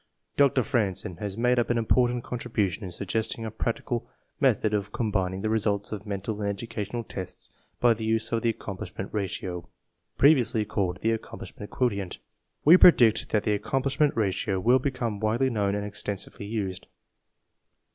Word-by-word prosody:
Dr. 140 -2 +4
Franzen 100 -9 -1
has 100 -1 -4
made 125 +1 +3
an 120 0 +1
important 120 +1 +2
contribution 110 -5 -2
in 95 - -5
suggesting 110 +5 -2
a 110 - -4
practicable 115 +1 -3 0.3
method 110 - +2
of 105 -1 -1
com 110 -3 -2
bining 95 -1 -1
the 110 - 0
res 110 -2 +1
ults 100 0 0
of 105 0 -6
mental 100 +1 -3
and 100 - 0
educational 110 +2 -4
tests 95 -4 -8 0.3
by 120 -1 +5
the 110 0 -7
use 110 0 +1
of 115 -1 +1
the 115 - +2
Accomplishment 100 -3 -6
Ratio, 95 -4 -3 0.5
previously 120 -7 +4
called 100 -3 -2
the 115 - +2
Accomplishment 110 -2 -6
Quotient. 100 -7 -1 0.5
We 165 +5 +9
predict 120 -12 +6
that 105 -1 +1
the 105 - +1
Accomplishment 135 +7 0
Ratio 95 -2 0
will 120 +7 +4
become 120 -5 -2
widely 115 +5 +1
known 100 -3 0
and 105 0 -2
extensively 100 0 -5
used. 100 -4 -4
110 Hz, 160 wpm, -27 LUFS, 100-120 Hz, 0.5 s, We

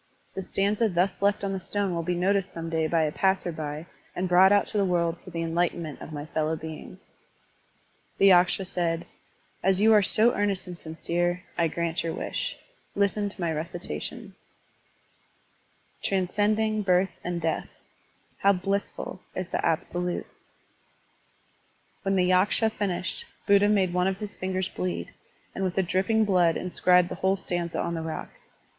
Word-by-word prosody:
The 190 - -4
stanza 205 +4 +1
thus 180 +1 0
left 200 0 +2
on 195 -1 -1
the 190 - -2
stone 200 0 -1
will 170 - -1
be 175 +2 -1
noticed 195 +1 +1
some 165 0 -6
day 160 -1 +1
by 165 0 +2
a 155 - 0
passer 190 0 +1
by 155 0 -5 0.3
and 185 +1 -1
brought 185 +2 +6
out 205 0 +4
to - - -3
the - - +3
world 170 -2 +1
for - - -11
the 165 -1 -3
enlightenment 165 -2 -1
of - - -8
my 145 -1 -5
fellow 155 0 -1
beings. 160 +4 -9 1.1
The - - +4
Yaksha 180 +1 +4
said: 170 -2 -1 0.6
As 190 0 +2
you 220 +2 +6
are 210 - +7
so 220 +4 +4
earnest 200 -2 0
and 180 -1 -7
sincere, 175 +2 -2
I 170 - +2
grant 170 +1 -2
your 165 - -3
wish. - - -3 0.4
Listen 200 +1 +1
to 200 - -15
my 170 -2 0
reci 160 +3 -4
tation: 220 -5 -5 1.7
"Transcending 210 +3 +1
birth 185 -1 +2
and 175 -1 -2
death, 160 -1 -2 0.7
How 200 0 +5
blissful 195 0 -3
is 185 -1 -3
the - - -2
Absolute 175 +2 -1
Tl - - -29 1.7
When 195 0 0
the 180 -1 +3
Yaksha 195 +4 +3
finished, 200 - -2 0.2
Buddha 200 0 +5
made 190 -4 +2
one 180 +1 +2
of 190 0 -1
his 205 0 -6
fingers 185 0 -2
bleed, 85 -1 -4 0.4
and 195 - -3
with 185 -1 -1
the 190 - +2
dripping 195 +5 +2
blood 180 -4 +3
inscribed 180 0 +3
the - - -4
whole 190 +1 +3
stanza 175 -3 -2
on 170 - -1
the 165 - -3
rock. 160 -1 -5
180 Hz, 170 wpm, -27 LUFS, 170-195 Hz, 1.7 s, are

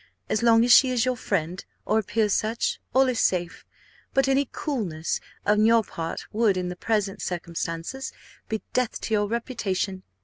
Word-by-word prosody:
As 215 - +1
long 230 0 +5
as 245 - +3
she 260 - +7
is 250 -2 +1
your 255 0 +1
friend, 180 -6 -2 0.2
or 215 - +2
appears 215 0 0
such, 225 +1 0
all 265 +1 +4
is 250 -3 0
safe; 175 -2 0 0.5
but 270 0 +4
any 270 0 +2
coolness 190 - -2 0.3
on 210 +1 +4
her 230 -1 +5
part 165 -4 -5
would, 215 -3 +3
in 180 -1 -2
the 180 - -5
present 205 -1 -1
circumstances, 170 +7 -4 0.4
be 220 -1 -2
death 250 -2 0
to 220 - -3
your 205 -1 +2
reputation. 205 -5 -2
215 Hz, 170 wpm, -25 LUFS, 185-235 Hz, 0.5 s, she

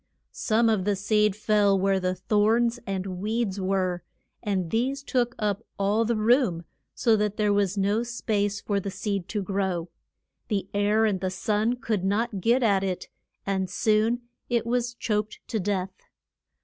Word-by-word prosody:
Some 230 +1 +1
of 215 -4 +2
the 205 +1 +1
seed 210 +1 +2
fell 205 -2 +3
where 195 0 +2
thorns 215 +6 +2
and 190 -1 -3
weeds 215 -2 -1
were, 185 -2 0 0.4
and 190 -6 -1
these 265 +5 0
took 245 -3 0
up 210 0 -1
all 205 +3 +2
the 235 +1 +1
room, 215 -6 +2 0.3
so 230 -3 +3
that 210 -1 -1
there 210 -1 +2
was 200 -1 +1
no 200 +3 +2
space 210 -4 -1
for 200 -1 -1
the 195 - -4
seed 195 -1 -3
to 210 -2 -2
grow. 190 -3 -2 0.6
The 200 -4 -1
air 205 +2 +3
and 200 -4 +1
the 185 - 0
sun 215 +5 0
could 225 -5 -2
not 205 +1 0
get 240 +6 +3
at 200 -4 +3
it, 185 -2 -3 0.4
and 190 -2 -1
soon 220 +3 +2 0.3
it 235 -1 +1
was 240 0 -1
choked 215 -2 -2
to 220 - -1
death. 190 -1 -1
205 Hz, 160 wpm, -26 LUFS, 195-225 Hz, 0.6 s, fell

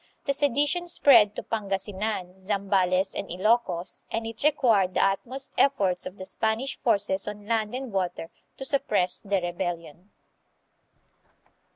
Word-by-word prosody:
The 280 - +1
sedition 290 +5 +1
spread 235 - +5
to - - -5
Pangasinan, 195 -2 -3
Zambales, 190 -1 +1
and 195 - -5
Ilokos, 185 -2 0
and 225 0 -3
it 225 -1 -7
re 300 - +7
quired 210 - +2
the - - +4
utmost 250 +7 -2
efforts 195 -10 +2
of 190 - -10
the 185 - -7
Spanish 220 +7 -1
forces 200 -5 +1
on 210 0 -7
land 220 0 -1
and 260 -2 -5
water 175 -3 -2 0.3
to 270 - -5
suppress 210 -10 +1
the 200 -1 0
rebellion. 175 0 -5
205 Hz, 140 wpm, -26 LUFS, 185-235 Hz, 0.3 s, re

